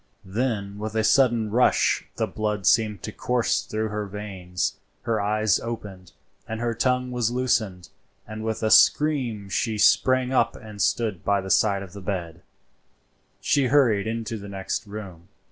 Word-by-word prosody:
Then 100 -1 -2
with 110 +1 -5
a 110 - +2
sudden 115 -3 +3
rush 125 +3 +2
the - - 0
blood 105 -2 -3
seemed 105 +1 +2
to - - -5
course 125 -1 0
through 110 0 -3
her 105 0 -3
veins, 95 -2 -4 0.2
her 115 -3 0
eyes 105 -1 +1
opened, 100 -6 -7 0.3
and 110 0 -4
her 120 0 -1
tongue 125 +2 0
was 120 -2 0
loosed, 125 0 +2 0.7
and 110 0 -7
with 110 0 -3
a 110 - +1
scream 130 -9 +4
she 110 +2 -1
sprang 130 +4 +3
up - - +2
and 105 -3 -9
stood 100 -1 0
by 100 0 +2
the 95 0 -4
side 100 -2 +3
of 95 -2 -12
her 100 - -9
bed. 90 -3 -4 1.0
She 140 -3 +2
hurried 120 -7 +3
into 115 0 -3
the 100 0 -9
next 95 +1 -4
room. 95 -5 -9
110 Hz, 160 wpm, -24 LUFS, 100-115 Hz, 1.0 s, scream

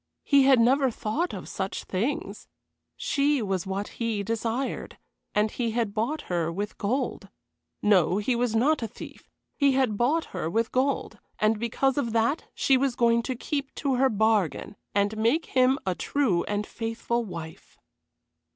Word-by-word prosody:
He 280 -2 +5
had 265 -2 +6
never 265 +3 +4
thought 245 +10 -2
of 185 - -7
such 190 0 -4
things. 220 +10 -3 0.5
She 285 0 +1
was 195 -5 -2
what 195 +2 -2
he 225 -3 -2
desired, 230 +4 -3 0.4
and 210 +1 +2
he 235 -3 -2
had 225 -3 -1
bought 235 +9 -1
her 170 -2 -1
with 205 +4 -5
gold. 230 -2 -2 0.5
No, 185 -4 +4
he 225 +4 0
was 235 -1 0
not 275 +6 +3
a 225 - -2
thief, - - -12 0.3
he 280 -2 +3
had 260 -6 +1
bought 295 +8 +2
her 175 -4 -2
with 225 +5 0
gold, 270 +2 0 0.2
and 215 0 +2
because 265 +4 +1
of 235 -5 -2
that 230 +7 +1
she 270 - +3
was 265 -1 0
going 235 -1 +3
to 255 +2 -3
keep 280 +2 -4
to 275 -3 0
her 265 +1 +4
bargain, 215 - +1 0.2
and 200 +1 +2
make 235 +10 +2
him 255 +1 +3
a 185 - +1
true 190 - 0
and 205 0 -2
faithful 230 +1 -2
wife. 165 -6 -9
230 Hz, 165 wpm, -26 LUFS, 205-265 Hz, 0.5 s, had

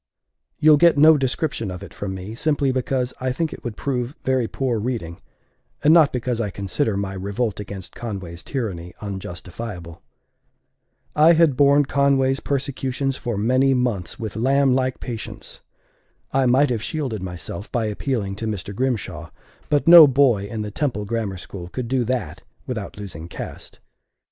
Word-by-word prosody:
You'll 155 -1 +6
get 170 0 +5
no 155 +2 +8
description 135 -4 -1
of 90 +1 -7
it - - -11
from 95 -2 -5
me, 95 +3 -7
simply 145 +1 +1
because 130 0 -1
I 130 0 0
think 160 +4 -2
it - - -10
would 120 -4 -5
prove 130 0 -2
very 130 -3 +1
poor 125 -3 -1
reading, 105 -8 -4 0.6
and 150 - +6
not 160 -4 +6
because 125 -1 -2
I 105 - -1
consider 100 +4 -1
my 100 -1 -3
revolt 100 +3 -2
against 95 -4 -6
Conway's 95 -7 -6
tyranny 95 - -4
unjustifiable. 90 -2 -7 1.1
I 155 +3 +7
had 160 -4 +4
borne 140 +1 +5
Conway's 135 -1 +2
persecutions 135 -1 -2
for 120 -5 -4
many 130 +5 +3
months 120 -8 -1
with 110 -2 -5
lamb 135 +3 +3
like 130 0 0
patience. 115 -3 -7 0.7
I 135 -1 +2
might 130 +2 +4
have 115 -3 -1
shielded 130 - -3
myself 90 +1 -6
by 120 -2 0
appealing 105 -2 -2
to 110 - -4
Mr. 100 -2 -4
Grimshaw; 100 -10 -2 0.4
but 145 +2 +1
no 165 -2 +11
boy 130 -7 +3
in 110 0 -4
the 105 - -5
Temple 115 -5 -2
Grammar 105 -3 -2
School 90 0 -8
could 120 +6 -5
do 130 0 +1
that 125 0 -3 0.2
without 110 -6 -5
losing 90 -5 -7
caste. - - -9
120 Hz, 160 wpm, -22 LUFS, 100-135 Hz, 1.1 s, no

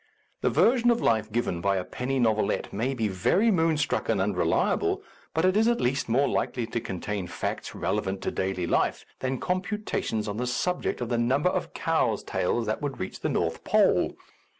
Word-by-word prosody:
The - - +2
version 240 0 +4
of 235 -1 +3
life 110 -1 +1
given 105 -7 -1
by 100 +1 +2
a 90 - -1
penny 125 +8 -3
novel 110 -4 +2
ette - - -4
may 125 +6 -1
be 115 -3 0
very 120 - +2
moonstruck 160 -5 +1
and - - +2
unreliable, - - +1 0.3
but 160 +2 +1
it 185 +1 +3
is 220 +2 +4
at 235 0 +2
least 135 +1 0
more 135 +5 +3
likely 120 -2 -1
to 115 +1 -3
contain 95 -1 -4
facts - - -4
relevant 100 -2 -2
to - - -1
daily 95 -2 -1
life - - 0
than 130 0 -1
computations 185 - -2
on 105 0 -3
the 125 +1 -1
subject 180 +3 -1
of 120 - -2
the 120 - +1
number 135 +8 +2
of - - -3
cows' 160 - +1
tails 115 +6 0
that 110 0 -2
would 145 -2 -3
reach 95 - -5
the - - -1
North - - -1
Pole. - - +3
120 Hz, 195 wpm, -27 LUFS, 105-160 Hz, 0.3 s, version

